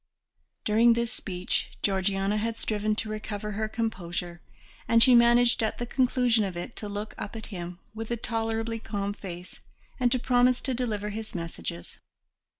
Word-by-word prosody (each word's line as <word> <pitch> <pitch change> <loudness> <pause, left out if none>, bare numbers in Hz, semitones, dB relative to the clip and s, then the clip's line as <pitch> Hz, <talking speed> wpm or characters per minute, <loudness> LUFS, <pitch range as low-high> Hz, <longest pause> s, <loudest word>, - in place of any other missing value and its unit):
During 230 +2 +5
this 235 0 -1
speech 180 -2 -3
Georgiana 195 +1 +1
had 225 +1 -1
striven 215 0 0
to 220 - -2
recover 210 -1 -4
her 215 +1 -1
composure, 175 -6 -3 0.5
and 230 0 +7
she 255 - +7
managed 240 0 +6
at 220 - 0
the 240 - -3
conclusion 245 -2 +2
of 190 -3 -3
it 175 +7 -6
to 210 - -4
look 205 +1 -4
up 210 - -5
at 220 - -6
him 175 -1 -5 0.2
with 225 0 -6
a 235 - -1
tolerably 225 0 -2
calm 200 -2 -3
face 180 -3 -9 0.4
and 245 -1 +3
to 255 - +3
promise 250 0 +3
to 260 - -1
deliver 215 -4 -2
his 215 0 -6
messages. 85 - -5
215 Hz, 165 wpm, -28 LUFS, 200-235 Hz, 0.5 s, and